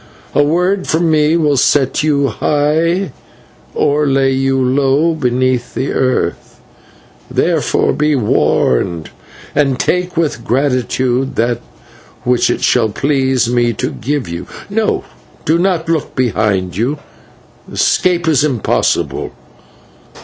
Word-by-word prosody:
A - - +3
word 180 +6 +1
from 165 +1 +1
me 155 +1 +3
will 150 -4 +2
set 135 +1 +2
you 140 -2 +1
high 160 +4 0 0.6
or 145 +1 +1
lay 135 0 +2
you 135 0 +1
low 135 +5 +2
beneath 130 -3 -1
the 135 - -2
earth; 130 -1 -1 0.7
therefore - - +1
be 150 0 +1
warned 85 - +1 0.4
and 135 -3 +1
take 180 -1 -1
with 150 -8 -1
gratitude 130 0 0
that 120 +1 0 0.6
which 125 0 +2
it - - -1
shall 115 -3 +3
please 130 +1 +1
me 120 -1 +1
to - - -3
give 145 +3 -3
you. 85 +1 -6 0.2
No, 220 +1 0 0.4
do 160 +2 +2
not 175 -3 0
look 160 -3 -2
behind 100 -7 0
you 125 +9 -1 0.7
escape 175 -2 +1
is 150 -3 +3
impossible. 130 -8 0
135 Hz, 120 wpm, -15 LUFS, 125-155 Hz, 0.7 s, A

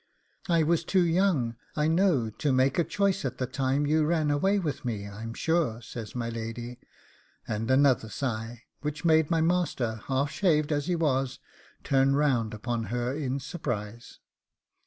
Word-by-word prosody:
'I 165 -2 +4
was 165 +1 +2
too 185 +2 +2
young, 165 -10 +1 0.2
I 150 0 +1
know, 160 - +2
to 145 +6 -1
make 130 +3 +2
a - - +4
choice 195 +4 0
at 130 -2 -3
the 130 - -1
time 135 +2 0
you 155 +2 +3
ran 155 -1 +1
away 190 +8 +2
with 150 -8 -3
me, 105 -5 -3
I'm 115 +3 -7
sure,' 160 -9 0
says 110 0 -8
my 120 -1 -2
lady, 115 +1 -5 0.7
and 110 +2 -2
another 130 -4 +3
sigh, 115 -1 -4 0.2
which 150 +1 -4
made 160 -2 +4
my 165 -2 +2
master, 155 - 0
half 140 +1 0
shaved 155 -1 +2
as 145 +1 0
he 180 - +1
was, 135 -5 0 0.5
turn 135 0 +3
round 130 -7 +2
upon 115 +1 -3
her 120 +4 -2
in 140 -2 -2
surprise. 120 - -5
135 Hz, 165 wpm, -28 LUFS, 120-160 Hz, 0.7 s, I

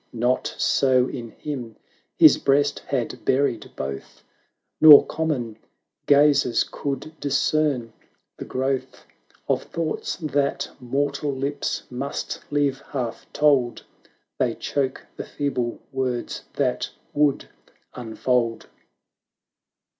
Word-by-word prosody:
Not 125 +2 0
so 130 -2 +3
in 115 -2 -6
him; 120 -3 -6 0.4
his - - +7
breast 140 +1 +2
had 130 -4 -3
buried 130 -5 +1
both. 70 0 -6 0.6
Nor 150 -2 +10
common 130 -9 -3 0.5
gazers 145 -4 +4
could 140 +2 -5
discern 140 -4 0 0.4
the - - -8
growth 130 0 -3 0.4
Of - - +1
thoughts 165 -2 -3
that 145 -4 -1
mortal 140 +3 -1
lips 140 +2 -3
must 135 +3 -4
leave 145 -2 0
half 125 -5 -5
told; 140 -5 +2 0.6
They - - +1
choke 135 -2 -2
the - - -4
feeble 125 -5 -2
words 125 -2 -3
that - - -1 0.2
would 145 -1 +1 0.5
unfold. 120 0 -1
135 Hz, 100 wpm, -24 LUFS, 125-145 Hz, 0.6 s, Nor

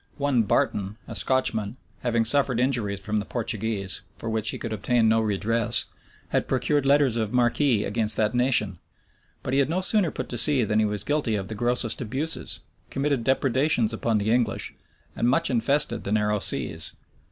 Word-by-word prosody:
One 140 -4 +1
Barton, 105 -3 -1
a - - -7
Scotchman, 120 -4 +2 0.2
having 115 -2 0
suffered 130 0 +2
injuries 120 -6 0
from 105 +2 -2
the - - -3
Portuguese, 110 -4 -2 0.2
for 115 - -5
which 110 -1 -1
he - - -3
could 115 -2 -5
obtain 110 +3 +1
no 110 0 +3
redress, 110 +2 0 0.4
had - - -1
procured 145 -2 0
letters 140 -4 +3
of 110 -2 -2
marque 120 -1 +1 0.3
against 110 +1 +1
that 110 +1 +1
nation; 120 -7 +1 0.6
but 130 - -3
he 135 - +3
had 140 - +1
no 175 +3 0
sooner 190 -1 +2
put - - -6
to 120 - +2
sea 140 -3 +3
than 105 0 0
he 110 - +3
was 105 -1 -3
guilty 145 -4 -1
of 95 -2 -4
the - - -4
grossest 120 +1 0
abuses, 135 +8 -2 0.3
committed 140 -3 -1
depredations 130 -2 +1
upon 110 0 0
the 105 +1 -1
English, 120 0 -1 0.4
and 120 - +1
much 150 +4 +1
infested 125 0 +1
the 100 - -4
narrow 105 0 +1
seas. - - +1
115 Hz, 180 wpm, -25 LUFS, 105-130 Hz, 0.6 s, no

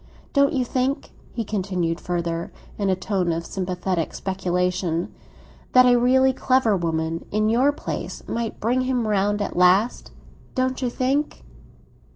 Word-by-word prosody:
Don't 280 0 +4
you 260 -3 +1
think," 260 +3 -1 0.2
he 230 - -3
continued 185 -5 -1
further, 170 -1 -2 0.3
in 200 -1 +1
a 190 - +3
tone 185 -1 -1
of 165 +1 -3
sympathetic 180 -2 -2
speculation, 180 -2 -1 0.6
"that 255 0 +7
a 245 -1 +6
really 260 +2 +4
clever 255 -5 +2
woman, 165 -2 -2
in 215 +1 +1
your 255 +6 +4
place, 290 - -6
might 230 -1 -3
bring 245 +4 +1
him 255 -3 0
round 205 0 +1
at - - -5
last? 185 +6 +3 0.5
Don't 260 +1 0
you 250 - 0
think?" 270 +5 -1
205 Hz, 145 wpm, -23 LUFS, 180-255 Hz, 0.6 s, that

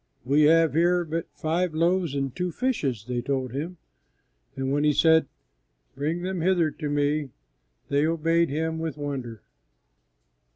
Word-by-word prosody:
"We 145 +4 +4
have 165 -1 +5
here 175 +2 +2
but 165 +1 -3
five 165 +1 -1
loaves 170 -2 +1
and 135 -2 -2
two 180 -1 -2
fishes," 145 - -1
they 125 -1 -2
told 130 -2 -2
Him; 160 +7 -5 0.8
and 135 0 -2
when 145 +1 +1
He 150 0 +4
said, 160 0 +4 0.7
"Bring 155 +6 -2
them 185 -1 -2
hither 175 -3 +2
to 150 -1 -5
Me," 145 0 0 0.6
they 145 +2 +2
obeyed 165 +1 +2
Him 160 +3 -2
with 160 -3 -4
wonder. 130 -6 -5
155 Hz, 150 wpm, -26 LUFS, 140-170 Hz, 0.8 s, have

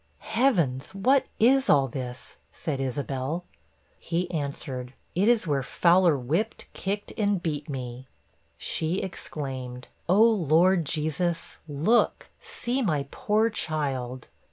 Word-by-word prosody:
'Heavens! 185 - +1
what 260 +7 +3
is 265 +4 +4
all 140 -2 +5
this? 125 -1 -7
' - - -41
said 140 -4 -3
Isabel. 135 +5 -2 0.5
He 175 +1 -2
answered, 135 -5 -4 0.2
'It 190 +5 +2
is 235 -4 +4
where 145 -4 +1
Fowler 170 +3 +4
whipped, 160 - -1
kicked, 205 +2 -3
and 205 -2 +2
beat 150 -3 -3
me.' 130 -1 -6 0.5
She 160 +3 -1
exclaimed, 130 -8 -6 0.2
'Oh, 200 +5 +6
Lord 180 -3 +3
Jesus, 160 +3 -1
look! 160 +11 +1
see 250 +3 -2
my 155 - 0
poor 220 +2 +1
child! 135 - -2
160 Hz, 120 wpm, -27 LUFS, 135-195 Hz, 0.5 s, Oh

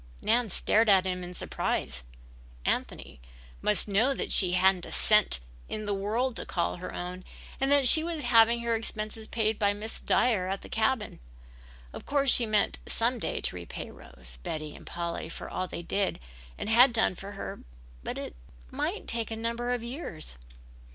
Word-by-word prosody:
Nan 230 +1 +2
stared 220 +4 +2
at 190 -2 +5
him 180 -1 -2
in 180 0 -8
surprise. - - -1 0.6
Anthony - - -3 0.4
must 210 +1 +3
know 225 +7 +2
that - - -3
she 180 -3 +5
hadn't 185 0 +3
a - - -8
cent 210 - +4 0.3
in 215 0 -4
the 205 - -1
world 225 +6 -1
to - - -4
call 170 0 -1
her 180 - -7
own 180 +1 -6 0.4
and 270 - +1
that 285 -2 +5
she 315 +5 +9
was 330 -3 -3
having 235 -1 +5
her 235 0 0
expenses 220 0 -3
paid 220 -1 0
by 205 -1 +3
Miss 215 +2 -4
Dyer 215 -7 +2
at 195 +1 -3
the - - -11
cabin. 220 0 -1 0.7
Of - - -10
course 280 -2 +4
she 235 - +5
meant 210 -1 +1
some 235 +2 0
day - - -3
to - - -2
repay 85 -2 -7
Rose, - - -10
Betty 155 - -5
and - - -14
Polly 170 -1 -4
for - - -7
all 185 - -3
they 170 - -7
had 190 - +1
done 225 -4 +2
for 195 +3 -9
her 195 - -6 0.4
but - - -5
it - - -6 0.4
might - - -3
take 230 -1 -3
a 225 - -4
number 235 +2 -3
of 245 -2 -2
years. 235 - -5
210 Hz, 180 wpm, -28 LUFS, 180-235 Hz, 0.7 s, she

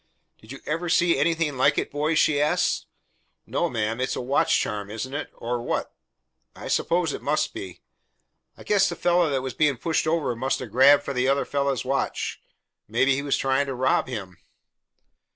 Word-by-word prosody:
"Did 110 - -14
you 135 - -9
ever 165 +3 -2
see 170 0 +3
anything 160 -2 0
like 140 +3 +3
it, - - -1
boys?" 150 +2 0
she 145 -2 +3
asked. 150 - +1 0.6
"No, - - -1
ma'am. 115 +1 -2
It's 130 - -1
a - - -3
watch 130 +3 +2
charm, 105 -2 -3
isn't 115 +5 -5
it? 145 - -4
Or 120 +1 -3
what?" - - -3 0.6
"I - - -8
suppose 170 -3 +1
it - - -6
must 150 +1 0
be." 95 -2 -8 0.7
"I - - -12
guess 200 -2 +3
the 170 - -4
fellah 175 -1 +2
that 135 -2 -1
was 130 -2 -4
being 150 -4 +2
pushed 160 +4 -1
over 155 -6 0
must 130 +3 -1
'a' 130 - -5
grabbed 135 +6 +5
for 140 - -4
the 125 0 0
other 140 +1 +2
fellah's 140 -2 -1
watch. 135 +1 -2 0.5
Maybe 125 +5 +2
he 135 - -1
was 140 -1 0
trying 135 +1 +1
to 135 - -3
rob 130 +1 +1
him." 95 -8 -7
140 Hz, 190 wpm, -25 LUFS, 125-155 Hz, 0.7 s, grabbed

